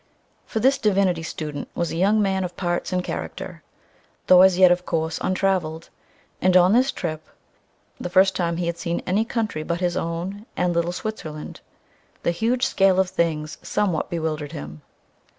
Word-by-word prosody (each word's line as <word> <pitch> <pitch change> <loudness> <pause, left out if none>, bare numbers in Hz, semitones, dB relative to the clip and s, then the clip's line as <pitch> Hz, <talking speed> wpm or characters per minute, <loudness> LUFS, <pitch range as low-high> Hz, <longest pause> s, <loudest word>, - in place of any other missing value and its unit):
For 220 - -2
this 265 +5 +3
"divinity 195 -5 +2
student" 150 -3 -5
was 170 - -1
a - - -4
young 205 +5 +3
man 190 -1 0
of 180 -1 -6
parts 175 -1 -2
and 180 -1 0
character, - - -6 0.6
though 185 0 +7
as 190 -1 +6
yet, 185 -1 +7
of 180 0 +2
course, 160 -2 -2
untraveled; 185 -4 -1 0.5
and 185 0 +5
on 180 +2 +5
this 255 +3 +4
trip 155 -3 -4 0.8
the - - -4
first 190 +2 +4
time 170 -2 -1
he 175 - -1
had 170 0 -3
seen 170 -1 -2
any 195 +4 +2
country 225 -9 -2
but 170 +2 -2
his 180 -1 0
own 180 +7 -4
and 180 -1 +1
little 170 +1 0
Switzerland 175 -6 -6 0.6
the - - +2
huge 240 +8 0
scale 195 -5 +3
of 190 -1 +1
things 155 -4 -1
somewhat 180 -7 -1
bewildered 155 -4 -3
him. 75 +1 -8
180 Hz, 170 wpm, -23 LUFS, 165-195 Hz, 0.8 s, though